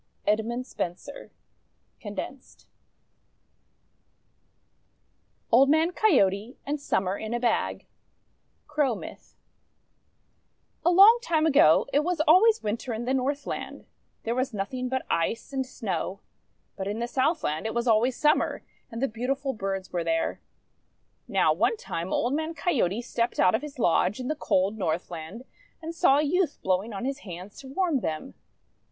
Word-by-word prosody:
EDMUND 225 +4 0
SPENSER 185 +7 -6 0.7
(condensed) 220 +5 -8 2.9
OLD 265 +4 +6
MAN 315 +3 +3
COYOTE 235 - +2
AND 290 0 -3
SUMMER 190 -7 -1
IN 220 +2 -3
A - - -1
BAG 235 -2 0 0.8
Crow 295 -5 0
Myth - - -11 1.5
A - - +4
LONG 400 +7 +8
time 320 -10 +1
ago, 275 - +5
it 285 - +5
was 350 0 -1
always 380 +9 +5
Winter 230 +3 -3
in 235 +2 -4
the 260 - 0
Northland. 275 +2 -3 0.4
There 230 - -1
was 255 -1 -2
nothing 250 +6 -3
but 260 0 -2
Ice 225 +10 -1
and 265 -1 -1
Snow. 200 -5 -4 0.5
But 190 -1 -4
in 205 +2 -3
the 235 +1 -2
Southland 260 - 0
it 225 - -5
was 235 +1 -1
always 235 +3 +3
Summer, 300 0 +1 0.3
and 230 +3 -5
the - - +3
beautiful 265 +4 -2
birds 195 -3 -4
were 175 -1 -1
there. 165 0 -1 0.9
Now - - +3
one 460 - +1
time 170 - -5
Old 245 +3 0
Man 315 +2 -2
Coyote 245 - 0
stepped 235 -1 -2
out 185 -1 +5
of 220 - +1
his 295 -2 -9
lodge 185 0 +2
in 255 - -4
the 310 - 0
cold 200 -6 0
Northland, 170 +4 -4 0.4
and 330 0 -6
saw 335 -5 +4
a 295 - +2
youth 335 +1 +1
blowing 190 +4 0
on 200 +3 -5
his 275 +1 -3
hands 185 -2 -9
to 270 - -11
warm 315 +1 0
them. 155 -8 -4
245 Hz, 145 wpm, -27 LUFS, 200-290 Hz, 2.9 s, LONG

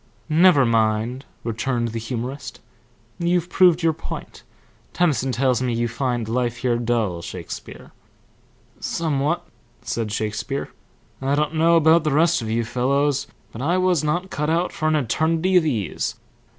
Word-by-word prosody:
"Never 160 -3 +5
mind," 115 +3 +1 0.2
returned 120 +1 -1
the 115 +1 -4
humorist. 125 +4 -5 0.6
"You've 175 0 +1
proved 180 -2 +4
your 165 -1 +3
point. 160 - -8 0.5
Tennyson 145 -6 +1
tells 125 -1 +1
me 125 -2 0
you 120 +1 0
find 120 -1 -2
life 120 0 -1
here 120 -2 0
dull, 115 -7 0
Shakespeare." 85 -1 -8 0.9
"Somewhat," 155 0 -1 0.4
said 115 -3 -3
Shakespeare. 110 +6 -3 0.5
"I 135 +1 +1
don't 150 +1 0
know 165 +1 +4
about 165 0 +5
the 155 - 0
rest 165 0 +3
of 110 - -4
you 115 +1 0
fellows, 140 +4 0 0.2
but 115 - -8
I 170 +6 +1
was 185 -4 +2
not 175 +5 -1
cut 150 +1 -1
out 170 +2 +1
for 155 - -1
an 155 - +3
eternity 160 - +1
of 170 -3 +5
ease. 110 - -2
135 Hz, 150 wpm, -22 LUFS, 115-160 Hz, 0.9 s, Never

